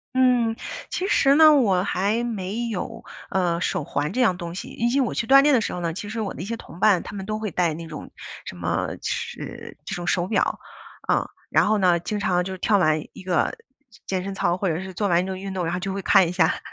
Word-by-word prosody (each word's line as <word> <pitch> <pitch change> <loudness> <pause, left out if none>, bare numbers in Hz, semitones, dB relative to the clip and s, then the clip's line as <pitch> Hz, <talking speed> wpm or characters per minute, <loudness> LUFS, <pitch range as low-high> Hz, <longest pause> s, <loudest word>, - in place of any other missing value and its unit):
嗯， 245 -3 +3 0.3
其 375 - -2
实 275 -8 +4
呢， 310 -1 +8
我 195 -10 +3
还 205 +5 0
没 220 0 -3
有， 225 +2 -5 0.3
呃， 180 -3 0
手 155 - -1
环 145 +1 -2
这 255 - 0
样 190 -7 +4
东 170 -1 -6
西。 - - -6
以及 240 +4 0
我 255 - +1
去 235 - -2
锻 275 +1 +8
炼 295 -1 +5
的 240 - +4
时 - - -2
候 180 - -4
呢， 165 -1 -1
其 205 +3 -6
实 225 - -4
我 210 -3 -2
的 - - -8
一 - - -4
些 230 +2 -4
同 175 - -12
伴 205 -4 +4
他 - - -9
们 195 - -5
都 215 0 -2
会 215 -4 -4
戴 170 -3 +1
那 165 +1 -7
种 155 - -8 0.3
什 90 - -8
么， 85 -1 -1 0.2
是 - - -5
这 - - -5
种 175 0 -5
手 175 +1 +1
表 220 - 0 0.5
啊。 - - +2 0.2
然 - - +4
后 215 0 +3
呢， 180 -3 +3
经 210 +4 -3
常 180 -3 +1
就 190 0 -5
跳 205 +2 +2
完 155 -2 +3
一 - - -11
个 180 - 0 0.5
健 185 -1 -1
身 195 - -4
操， 180 -2 0
或 195 - -1
者 165 0 0
是 190 -1 -8
做 205 0 0
完 175 -1 +3
一 - - -5
个 190 -1 -4
运 195 0 -6
动， 185 -2 -2
然 165 - -1
后 180 - -2
就 190 +1 -3
会 195 - -3
看 185 -2 +5
一 - - -3
下， 175 -3 +2
190 Hz, 275 characters per minute, -24 LUFS, 175-225 Hz, 0.5 s, 呢